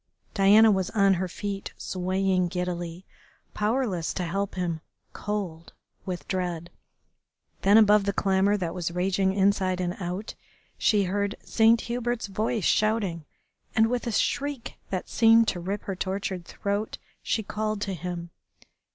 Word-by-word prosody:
Diana 215 +2 +6
was 190 -2 0
on 200 -3 +4
her 185 0 -1
feet, 195 +2 -5
swaying 185 0 0
giddily, 175 0 -4 0.5
powerless 210 -6 -1
to 180 - -1
help 195 +4 -2
him, 170 -3 -2 0.3
cold 190 -6 -4 0.3
with 180 -1 -4
dread. 175 -3 -3 0.9
Then 200 +2 +6
above 210 -2 +6
the 200 - +1
clamour 195 +1 +2
that 170 -4 -3
was 180 -2 -2
raging 190 +2 +1
inside 190 -1 +2
and 180 0 -1
out 185 +3 -4 0.5
she 210 -2 +3
heard 200 +2 -1
Saint 225 0 +4
Hubert's 240 0 -2
voice 215 0 -1
shouting, 205 -7 +1 0.5
and 220 +1 +4
with 245 0 -1
a - - 0
shriek 280 +3 -1 0.2
that 185 -2 -3
seemed 225 0 +5
to 180 - -3
rip 195 +4 -4
her 195 - -4
tortured 190 -1 -3
throat 205 +2 -3 0.2
she 220 - -1
called 215 +1 -2
to 200 -1 -2
him. 175 0 -5
195 Hz, 140 wpm, -26 LUFS, 180-210 Hz, 0.9 s, Diana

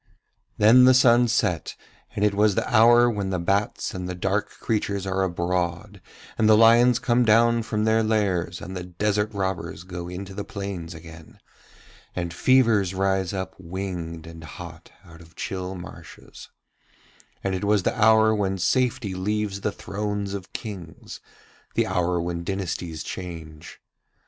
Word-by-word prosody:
Then 120 +4 +7
the 130 0 +6
sun 120 -1 +5
set, 90 -8 -1 0.4
and 105 - +1
it 105 - +2
was 105 0 +3
the - - -1
hour 120 +1 +6
when 105 -5 -2
the 95 - -1
bats 100 +4 -1
and 90 -1 -5
the 90 - -4
dark 95 +3 -1
creatures 100 -3 -2
are 95 0 -1
abroad 90 +2 -2 0.4
and 110 -1 +4
the 110 - +7
lions 115 +2 +6
come 125 -1 +2
down 115 +1 +4
from 105 -1 -2
their 110 +1 +3
lairs, 100 -6 0
and 95 - -7
the 90 - -4
desert 105 +4 -1
robbers 95 -4 -4
go 90 -1 -7
into 95 +2 -7
the 100 +1 -5
plains 95 -5 -6
again, 80 0 -13 0.8
and 85 -2 -3
fevers 110 -3 +3
rise 95 -1 0
up 95 -1 -4
winged 85 -3 -6
and 80 0 -11
hot 85 0 -10
out 85 -1 -15
of 80 0 -18
chill 95 0 -5
marshes, 90 - -12 0.9
and 95 - -1
it 95 - -3
was 105 -2 +2
the - - 0
hour 110 0 +5
when 95 -2 -1
safety 125 +1 0
leaves 100 +1 -2
the 105 - -1
thrones 105 0 -4
of 95 -2 -7
Kings, 90 - -8 0.6
the - - +2
hour 90 -1 0
when 85 0 -3
dynasties 85 -4 -4
change. 80 -4 -8
95 Hz, 155 wpm, -24 LUFS, 90-110 Hz, 0.9 s, Then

